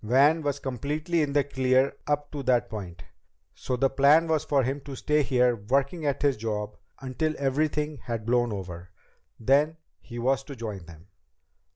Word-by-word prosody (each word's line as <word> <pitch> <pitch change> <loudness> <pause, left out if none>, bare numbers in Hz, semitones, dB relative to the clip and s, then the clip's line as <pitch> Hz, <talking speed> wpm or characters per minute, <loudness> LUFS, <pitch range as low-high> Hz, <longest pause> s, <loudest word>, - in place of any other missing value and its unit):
Van 140 +8 +4
was 145 -2 -1
completely 150 +6 -2
in 145 -2 0
the 145 -1 +3
clear 130 -1 +1
up 145 0 -1
to 145 - -4
that 125 -2 +1
point, 90 -6 -7 0.5
so 130 - -3
the 135 - +3
plan 145 +5 +4
was 160 -2 +1
for 140 -2 +2
him 135 +3 -2
to 135 0 -8
stay 150 +3 +1
here 125 -3 +2
working 140 +4 +1
at 140 0 -1
his 140 -4 +2
job 105 -1 -3 0.3
until 145 +4 -2
everything 150 +2 0
had 115 -2 -4
blown 120 0 +2
over. 90 -3 -7 0.5
Then 145 +7 +2 0.2
he 120 - -10
was 130 +3 +1
to 140 - -8
join 105 -7 -6
them. 85 +2 -14
135 Hz, 175 wpm, -27 LUFS, 120-145 Hz, 0.5 s, Van